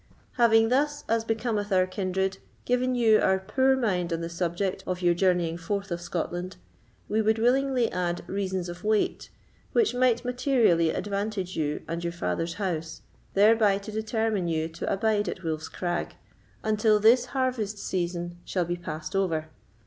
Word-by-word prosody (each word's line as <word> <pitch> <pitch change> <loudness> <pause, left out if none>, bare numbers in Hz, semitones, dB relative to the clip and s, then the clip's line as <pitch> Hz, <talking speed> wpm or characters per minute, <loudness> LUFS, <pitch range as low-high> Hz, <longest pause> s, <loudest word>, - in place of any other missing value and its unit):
"Having 225 -2 +4
thus, 290 +3 +1
as 225 0 +1
becometh 220 -2 -2
our 185 -1 +4
kindred, 190 0 -2 0.3
given 250 +1 +1
you 225 -3 +5
our 190 0 +3
poor 260 +8 +2
mind 180 -8 0
on 165 0 -1
the 165 - -4
subject 175 +2 -2
of 185 0 -3
your 175 0 +4
journeying 175 -2 +1
forth 200 +2 -3
of 170 0 -2
Scotland, 175 +1 -4 0.5
we 220 +1 +1
would 220 +1 +2
willingly 250 +1 +2
add 175 -1 -2
reasons 190 -2 -2
of 175 +1 -8
weight, 215 0 0 0.4
which 450 - +3
might 245 -1 +2
materially 245 - +3
advantage 200 0 -3
you 150 -2 -2
and 170 +1 -4
your 170 0 -2
father's 165 - -2
house, 165 -5 -3 0.3
thereby 210 0 +5
to 200 +2 -8
determine 220 -3 -1
you 160 -1 0
to 165 +1 -4
abide 210 +1 +1
at 185 - -6
Wolf's 160 -1 -3
Crag, 175 -1 -3 0.5
until 215 0 +3
this 235 +4 +5
harvest 240 -6 -1
season 175 -2 -3
shall 180 -2 -1
be 175 +1 -2
passed 170 +1 -6
over. 160 -5 0
195 Hz, 160 wpm, -27 LUFS, 175-225 Hz, 0.5 s, you